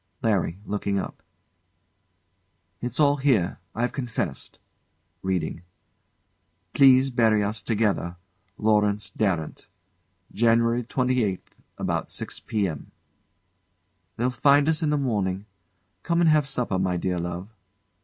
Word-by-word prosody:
] - - -31
LARRY. 95 -5 0
[Looking 100 -1 -2
up] 95 - -5 1.6
It's 125 +2 -4
all 145 -1 +4
here 130 -12 +1 0.2
I've 120 +2 0
confessed. 115 - -4 0.6
[Reading] 90 -3 -2 1.1
"Please 135 -1 +6
bury 110 -4 +3
us 105 +2 -2
together." 105 -6 0 0.4
"LAURENCE 105 -1 +1
DARRANT. 90 -8 -2 0.7
"January 115 +1 +3
28th, 125 -5 -1 0.2
about - - -2
six - - -3
p.m." 100 -10 -3 1.3
They'll 125 +2 +1
find 140 +3 +4
us 160 -1 +2
in 155 - +1
the 150 - +2
morning. 100 -7 -1 0.6
Come 170 -1 0
and 165 -2 +5
have 150 -2 +3
supper, 125 -8 0
my 90 -1 0
dear 90 0 -1
love. 90 +5 -5
110 Hz, 115 wpm, -25 LUFS, 95-130 Hz, 1.6 s, Please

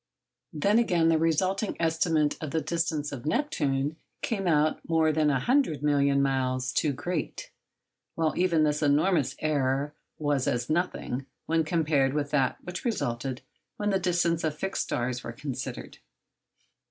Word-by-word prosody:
Then, 200 +9 +2
again, 175 -8 +3
the 160 -1 +3
resulting 185 +6 +1
estimate 160 -2 +2
of 155 - -3
the 160 - 0
distance 160 -3 -1
of 140 0 -6
Neptune 150 - 0 0.3
came 195 -5 -1
out 155 -1 +3
more 160 -1 +3
than 155 -1 +2
a 135 -2 +2
hundred 240 - +1
million 140 -1 +3
miles 130 -2 0
too 150 - +1
great; 155 +4 -4 0.6
while 160 -1 +1
even 170 -3 +3
this 150 0 +1
enormous 150 -1 +2
error 140 -1 0 0.2
was 145 -3 0
as 120 +3 -1
nothing 155 -6 -1 0.2
when 165 0 +2
compared 150 -4 +1
with 145 -1 -1
that 135 -4 +1
which 175 +1 -6
resulted 130 - -2 0.3
when 205 0 0
the 195 - +2
distances 175 -2 +1
of 155 -2 0
the - - -20
fixed 195 - -1
stars 125 0 -2
were - - -5
considered. 135 0 -6
155 Hz, 155 wpm, -28 LUFS, 140-170 Hz, 0.6 s, again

